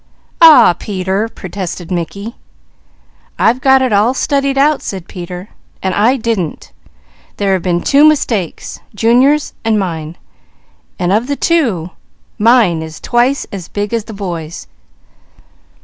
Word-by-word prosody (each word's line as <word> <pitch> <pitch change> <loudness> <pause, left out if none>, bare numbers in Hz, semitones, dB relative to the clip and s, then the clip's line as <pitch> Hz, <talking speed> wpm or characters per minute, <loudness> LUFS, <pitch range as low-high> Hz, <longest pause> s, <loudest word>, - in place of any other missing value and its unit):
"Aw - - +10
w 315 - +8
ah - - -3
Peter!" 195 +3 -3
protested 185 -4 -7
Mickey. 200 +6 -4 1.0
"I've 245 +3 +2
got 265 0 +4
it 255 -4 0
all 215 +6 +2
studied 275 -1 0
out," 290 +1 +3
said 190 -3 -6
Peter, 180 +1 -8 0.3
"and 190 -1 0
I 230 +7 +2
didn't! 220 - -3 0.7
There 200 -1 +1
have 185 - 0
been 175 -1 -1
two 280 +1 +4
mistakes, 245 - 0 0.2
Junior's 255 +7 +2
and 225 -1 +1
mine, 165 -4 -4 0.8
and 180 -1 0
of 225 +4 +1
the 285 - -1
two, 230 - 0 0.5
mine 215 -7 +3
is 160 0 -8
twice 250 +3 +1
as 185 -4 -7
big 205 +2 -4
as 230 -2 -1
the 225 - -9
boy's." 170 - -6
205 Hz, 140 wpm, -14 LUFS, 180-255 Hz, 1.0 s, Aw